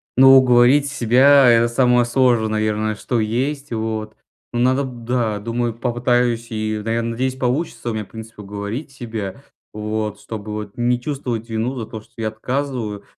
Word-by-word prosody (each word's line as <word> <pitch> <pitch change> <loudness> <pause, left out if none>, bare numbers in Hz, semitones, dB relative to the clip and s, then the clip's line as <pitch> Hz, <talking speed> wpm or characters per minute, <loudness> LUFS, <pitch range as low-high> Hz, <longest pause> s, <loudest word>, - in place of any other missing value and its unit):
Ну, 135 +1 +8
уговорить 130 +3 +5
себя 135 +1 +5
это 115 0 +5
самое 125 0 +3
сложное, 120 -2 +2
наверное, 110 0 -1
что 120 +3 -2
есть. 135 +6 -2
Вот. 110 -1 -3 0.4
Но 120 - -1
надо, 130 +3 +2
да, 120 -4 -2
думаю, 115 +2 -2
попытаюсь 120 -1 0
и, 110 -1 -2
наверное, 115 +1 -1
надеюсь, 130 +2 -1
получится 130 -1 -2
у - - -4
меня, 110 -2 -3
в - - -24
принципе, 110 -1 -10
уговорить 105 +8 -6
себя. 110 -6 -6 0.3
Вот. 105 0 -3
Чтобы 105 -1 -7
вот 105 -1 -6
не 120 0 +1
чувствовать 125 -5 -4
вину 115 +4 -2
за 115 - -4
то, 110 - -8
что - - -25
я 110 -1 -1
отказываю, 120 -2 -3
115 Hz, 165 wpm, -20 LUFS, 110-125 Hz, 0.4 s, Ну